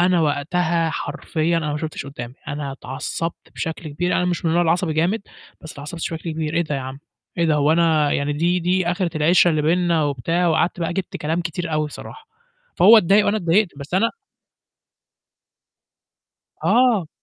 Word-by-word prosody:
أنا 180 0 +3
وقتها 165 +3 0
حرفيًا 165 +1 -2
أنا 155 -3 -1
ما 150 - -2
شُفتش 155 -3 -5
قُدّامي، 125 -3 -8
أنا 145 -1 -4
اتعصّبت 135 +5 -5
بشكل 160 0 -5
كبير، 175 +5 -1
أنا 180 - +1
مش 175 -1 -2
من 165 - +2
النوع 175 +2 +3
العصبي 170 0 +1
جامد 175 +8 0 0.4
بس 160 - -9
أتعصّبت 150 +4 -8
بشكل 165 0 -4
كبير. 155 0 -3
"إيه 170 - +2
ده 150 -3 -4
يا 135 - -2
عم؟ 130 +1 -7 0.4
إيه 170 - +3
ده؟ 160 - +2
هو 150 +1 +3
أنا 160 -3 +3
يعني 140 +1 0
دي 175 +4 +1
دي 180 +1 +1
آخِرة 175 0 0
العِشرة 175 +3 +4
اللي 155 -2 0
بيننا؟" 170 0 +2
وبتاع، 155 +6 0
وقعدت 165 +2 +1
بقى 170 +1 -1
جِبت 190 0 -4
كلام 160 +3 -2
كتير 170 -1 -4
أوي 155 -1 0
صراحة. 445 - -11 0.5
فهو 220 +5 +8
اتضايق 205 +1 +4
وأنا 205 - +2
اتضايقت، 190 +1 +2
بس 140 +4 -7
أنا 225 +5 +3 2.5
آه. 240 -9 +3
165 Hz, 180 wpm, -21 LUFS, 150-180 Hz, 2.5 s, فهو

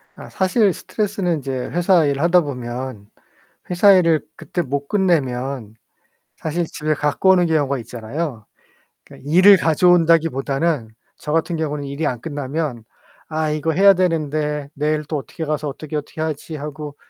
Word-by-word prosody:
아 - - -11
사실 190 +1 +2
스트레스는 195 -5 -2
인제 135 -2 -5 0.2
회사일 170 -5 +2
하다 175 +2 +4
보면 125 -6 -6 0.6
회사 180 +3 +5
일을 170 -4 +4
그때 175 - -4
못 140 -1 -3
끝내면 135 - -1 0.6
사실 165 +2 -2
집에 155 0 -2
갖고 150 +6 +1
오는 180 -2 +5
경우가 145 -4 +1
있잖아요. 120 +1 -5 0.6
그러니까 140 - -12
일을 185 +5 +7
가져온다기보다는 165 -5 +2 0.3
저 150 - -6
같은 165 +1 0
경우는 150 -2 -3
일이 140 +3 -3
안 125 -4 -3
끝나면 145 -4 -4 0.4
'아 155 -1 -1
이거 155 +1 -1
해야 195 +4 +6
되는데 155 -5 -1
내일 150 +1 -1
또 155 - -1
어떻게 145 +3 -7
가서 150 0 -2
어떻게, 150 +2 -6
어떻게 150 +2 -6
하지.' 155 0 -4
하고 150 0 -7
155 Hz, 330 characters per minute, -20 LUFS, 140-170 Hz, 0.6 s, 일을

